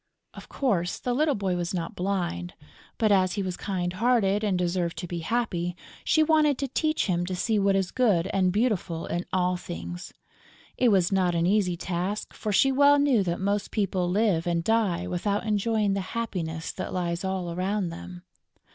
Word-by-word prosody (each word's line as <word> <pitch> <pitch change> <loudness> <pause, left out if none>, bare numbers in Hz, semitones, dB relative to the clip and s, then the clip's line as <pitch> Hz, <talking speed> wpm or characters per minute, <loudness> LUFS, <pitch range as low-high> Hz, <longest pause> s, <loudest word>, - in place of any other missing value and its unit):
Of - - -12
course, 185 -10 0
the 250 - -2
little 295 +2 +2
boy 195 -3 -1
was 175 +1 -2
not 170 -2 -3
blind; 175 - -2 0.4
but, 215 -2 +2
as 185 -2 +3
he 200 - -2
was 185 -1 -3
kind 180 -3 -3
hearted 210 -1 +2
and 200 -4 +1
deserved 175 -1 -1
to 175 +2 -5
be 170 0 -4
happy, 175 -3 -1 0.3
she 315 - +3
wanted 305 -3 +3
to 275 - -2
teach 310 +4 0
him 175 -3 0
to 185 - -2
see 215 +4 +1
what 195 0 +3
is 190 -2 0
good 210 -10 +2
and 185 -2 +2
beautiful 190 -6 0
in 175 +1 -3
all 180 -1 +1
things. 85 - -7 0.6
It 250 - +3
was 190 -4 +3
not 185 -3 +2
an 170 0 +1
easy 185 -2 +2
task, 185 +4 -3
for 215 - -4
she 270 +7 +4
well 285 +2 +5
knew 280 -6 +3
that 175 -2 -1
most 200 +1 -1
people 190 -4 0
live 185 -4 +1
and 170 -1 0
die 200 -4 +1
without 200 +4 -1
enjoying 215 -1 +1
the 195 - -1
happiness 180 -7 -4
that - - -5
lies 175 0 -2
all 190 -2 -2
around 185 +1 -1
them. 175 +1 -9
190 Hz, 190 wpm, -26 LUFS, 175-215 Hz, 0.6 s, well